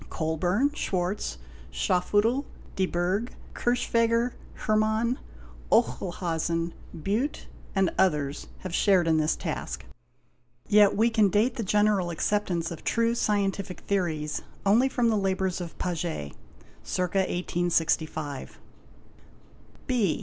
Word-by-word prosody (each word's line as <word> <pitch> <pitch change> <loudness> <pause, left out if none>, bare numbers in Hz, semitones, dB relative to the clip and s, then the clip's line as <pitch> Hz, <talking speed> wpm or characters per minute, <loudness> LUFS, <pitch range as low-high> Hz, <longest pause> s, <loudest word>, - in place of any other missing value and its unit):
Colburn, 175 - +1
Schwarz, 185 - -2 0.3
Schafheutl, 205 - +2 0.3
de 190 -1 +1
Burg, 185 +8 -1 0.2
Kirchwegger, 235 0 +1 0.3
Hermann, 220 +3 +2 0.5
Oechlhausen, 165 +3 0 0.3
Biitte, 210 - -1 0.3
and 195 -2 +3
others 150 -6 +1
have 185 -2 -6
shared 185 -3 +4
in 160 -1 +4
this 155 0 +2
task; - - -4 0.8
yet 205 -1 +6
we 230 +2 +4
can 215 -3 +4
date 215 +5 +2
the 230 - -3
general 205 -2 +2
acceptance 175 -1 -1
of 170 - -7
true 230 0 +2
scientific 200 -4 -1
theories 160 -6 -1 0.2
only 230 +7 +4
from 245 -3 +2
the 220 - +2
labours 190 -2 0
of 170 -2 -7
Paget, 165 - -3 0.5
(circa 180 +1 -1
1865). 165 -5 -1 1.3
B. 225 -10 +1
190 Hz, 105 wpm, -27 LUFS, 170-215 Hz, 1.3 s, yet